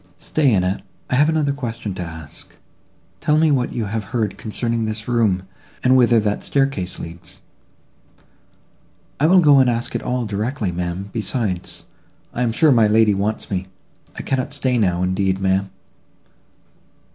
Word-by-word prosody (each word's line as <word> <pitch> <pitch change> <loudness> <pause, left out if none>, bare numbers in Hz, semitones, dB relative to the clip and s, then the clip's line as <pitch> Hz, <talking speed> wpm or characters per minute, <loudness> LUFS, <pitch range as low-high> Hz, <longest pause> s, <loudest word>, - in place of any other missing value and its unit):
"Stay, 145 +3 +1
Annette, 95 -1 +1 0.3
I - - +1
have 145 +4 +4
another 155 -3 +1
question 115 -7 -5
to 90 - -6
ask; 80 -3 -8 0.6
tell 150 - +2
me 160 -1 +4
what 125 -3 +1
you 115 - -2
have 105 +1 -3
heard 110 -1 -2
concerning 115 +1 -2
this 110 0 -4
room, 110 -6 +1 0.4
and 130 +1 +5
whither 120 -2 +5
that 105 -1 -1
staircase 135 -10 -1
leads." 85 +1 -10 1.8
"I 150 - +4
will 185 +2 +6
go 145 -4 +6
and 130 -2 +4
ask 120 0 -2
it - - -2
all 125 -1 -2
directly, 105 0 -2
ma'am; 90 +3 -4
besides, 105 -4 -3 0.5
I 125 - -3
am 120 -2 +1
sure 150 +6 +4
my 115 -4 +5
lady 110 0 +4
wants 105 +3 -2
me. 95 -1 -2 0.5
I - - -6
cannot 135 +2 -2
stay 130 -3 0
now, 90 -4 +1
indeed, 95 +1 0
ma'am." 95 0 +1
110 Hz, 160 wpm, -20 LUFS, 95-130 Hz, 1.8 s, will